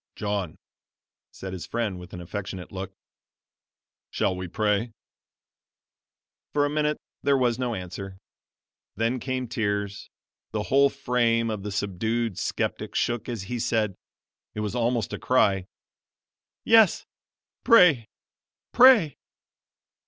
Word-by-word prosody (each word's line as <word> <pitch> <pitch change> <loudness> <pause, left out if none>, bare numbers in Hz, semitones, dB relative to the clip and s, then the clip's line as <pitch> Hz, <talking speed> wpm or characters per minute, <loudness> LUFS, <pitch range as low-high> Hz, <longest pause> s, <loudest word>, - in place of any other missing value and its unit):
"John," 100 -5 -3 0.8
said 95 -1 -8
his 95 - -6
friend, 110 -6 -2
with 90 - -11
an 90 - -7
affectionate 95 0 -6
look, 95 0 -6 1.2
"shall 95 - 0
we 90 0 -5
pray?" 105 +3 0 1.6
For 145 -1 +3
a 145 - -1
minute 150 0 0 0.2
there 140 0 +3
was 125 -2 +1
no 125 -2 -1
answer 95 +1 -7 0.8
then 115 +4 0
came 130 0 -3
tears; 100 -3 -2 0.4
the 105 -1 -1
whole 140 +4 +4
frame 120 -4 +1
of 105 -2 -4
the 105 +1 -5
subdued 105 +2 -2
skeptic - - -3
shook 120 0 -1
as 115 -5 -4
he 120 +5 -4
said 110 -3 0 0.6
it 105 - -3
was 105 -1 -3
almost 120 -3 0
a - - -4
cry: 100 -7 +2 1.0
"Yes, 225 -4 +5 0.6
pray, 170 - +6 0.6
pray!" 240 - +6
115 Hz, 120 wpm, -26 LUFS, 100-125 Hz, 1.6 s, pray